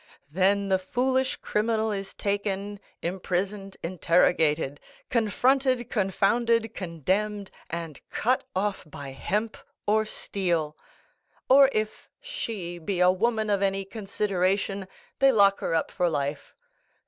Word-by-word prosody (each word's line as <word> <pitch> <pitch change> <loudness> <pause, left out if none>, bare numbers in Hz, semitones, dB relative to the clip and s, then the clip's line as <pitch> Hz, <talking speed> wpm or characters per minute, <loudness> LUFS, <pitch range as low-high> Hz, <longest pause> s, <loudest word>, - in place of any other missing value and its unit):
Then 195 +3 +2
the 190 -1 +3
foolish 260 +6 0
criminal 220 0 0
is 195 -1 -5
taken, 200 0 -2 0.2
imprisoned, 190 +2 -2
interrogated, 165 -4 +2 0.3
confronted, 250 +2 +2
confounded, 225 +3 +2
condemned, 190 +4 -2 0.2
and 165 -4 -5
cut 255 +3 +1
off 195 +1 -1
by 140 -2 -8
hemp 210 +11 -2 0.3
or 215 +1 +3
steel; 170 -7 -2 0.7
or 270 +1 +7
if 215 -2 -3
she 220 - -5
be 175 +3 -2
a 180 0 +6
woman 220 +2 0
of 200 -1 +2
any 195 0 0
consideration, 195 -1 -1 0.3
they 270 0 +6
lock 200 -4 +5
her 165 - -1
up 160 - 0
for 180 -2 +1
life. 145 -2 -3
200 Hz, 115 wpm, -27 LUFS, 180-220 Hz, 0.7 s, or